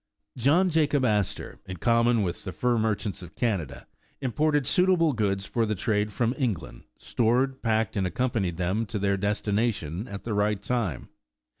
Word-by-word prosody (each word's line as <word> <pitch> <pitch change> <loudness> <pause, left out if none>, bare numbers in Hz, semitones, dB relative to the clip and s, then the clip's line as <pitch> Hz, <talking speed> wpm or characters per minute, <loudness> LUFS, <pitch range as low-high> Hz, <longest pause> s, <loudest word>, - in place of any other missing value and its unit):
John 160 +9 +3
Jacob 145 -4 +2
Astor, 105 -4 -1
in 90 - -6
common 115 +1 +3
with 90 -2 -3
the 95 - -5
fur 120 +3 +1
merchants 110 -3 -1
of 85 -2 -11
Canada, 100 - -2 0.3
imported 145 +2 +1
suitable 180 -3 +3
goods 100 -4 0
for 115 - 0
the 110 -1 0
trade 105 +1 0
from 120 +2 0
England, 100 - -3
stored, 130 +3 0
packed 110 -2 0
and 95 -3 +1
accompanied 100 -4 -1
them 95 +5 -1
to 100 - -3
their 100 0 +1
destination 100 - -1
at 100 -4 -7
the 115 - -3
right 105 0 +1
time. 105 - -2
110 Hz, 160 wpm, -27 LUFS, 100-125 Hz, 0.3 s, John